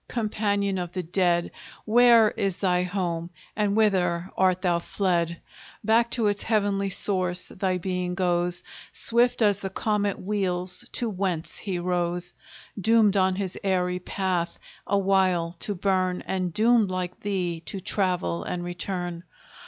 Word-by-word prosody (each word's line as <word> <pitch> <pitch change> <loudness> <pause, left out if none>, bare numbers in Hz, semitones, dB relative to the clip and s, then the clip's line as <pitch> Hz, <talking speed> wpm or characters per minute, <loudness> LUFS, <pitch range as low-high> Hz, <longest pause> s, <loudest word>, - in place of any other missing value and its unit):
companion 205 -4 -1
of 175 -1 -4
the 185 - -3
dead! 175 0 +1 0.3
Where 230 -1 +6
is 195 -3 -2
thy 180 -2 +2
home, 175 -2 -2 0.3
and 205 0 +1
whither 185 -4 +2
art 185 0 +2
thou 175 -2 +2
fled? 170 -2 -1 0.4
Back 230 +2 +3
to 230 - +1
its 205 -1 +1
heavenly 200 -3 +1
source 185 -2 -1
thy 185 -1 -1
being 180 0 -2
goes. 175 -1 0 0.3
Swift 235 0 +2
as 205 -2 +3
the 195 - -4
comet 205 -1 -1
wheels 185 +2 -2
to 240 - -1
whence 185 -5 -2
he 195 -3 -3
rose; 175 0 -1 0.5
Doomed 220 -1 +4
on 190 -1 +3
his 190 -2 -4
airy 180 -2 0
path 180 -2 -2 0.3
a 200 - +2
while 185 -3 +2
to 205 - -3
burn, 185 -1 0
And 185 -2 -2
doomed 220 +2 +3
like 185 -1 -3
thee 180 -5 -2
to 195 - -5
travel 180 - -1
and 175 -1 -4
return. 175 -1 -4
185 Hz, 145 wpm, -26 LUFS, 180-205 Hz, 0.5 s, Where